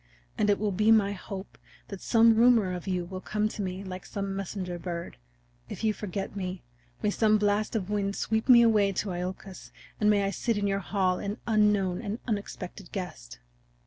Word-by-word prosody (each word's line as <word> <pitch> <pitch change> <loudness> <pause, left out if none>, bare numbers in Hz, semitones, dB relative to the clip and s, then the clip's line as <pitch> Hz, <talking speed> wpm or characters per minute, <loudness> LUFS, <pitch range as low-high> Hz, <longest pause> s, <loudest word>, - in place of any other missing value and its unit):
And 210 - +1
it 205 - +4
will 210 -1 -1
be 215 +4 +3
my 210 -3 +5
hope 195 0 -8 0.3
that 195 -2 -7
some 230 -1 +5
rumor 225 -5 +4
of 180 +2 -6
you 180 -2 -1
will 185 +1 -7
come 210 +1 0
to 215 - -6
me 185 0 -4
like 185 -1 -7
some 195 -1 -4
messenger 185 -2 -4
bird. 170 -1 -5 0.5
If - - -7
you 215 -1 +2
forget 200 -1 -5
me 185 -2 -4 0.4
may 210 - +2
some 215 0 +3
blast 210 +1 0
of 205 -2 -2
wind 200 -1 0
sweep 220 +3 -1
me 240 -2 +9
away 210 -4 +4
to 195 +1 -2
Iolcus, 185 +1 -6 0.3
and 210 - +3
may 205 -1 +3
I 195 - 0
sit 225 +3 -1
in 205 - 0
your 195 0 +1
hall 185 -1 0
an 205 +2 -4
unknown 210 -5 +2
and 200 - -3
an 225 - -5
unexpected 200 -3 -5
guest!" 110 - -6
200 Hz, 200 wpm, -28 LUFS, 185-215 Hz, 0.5 s, me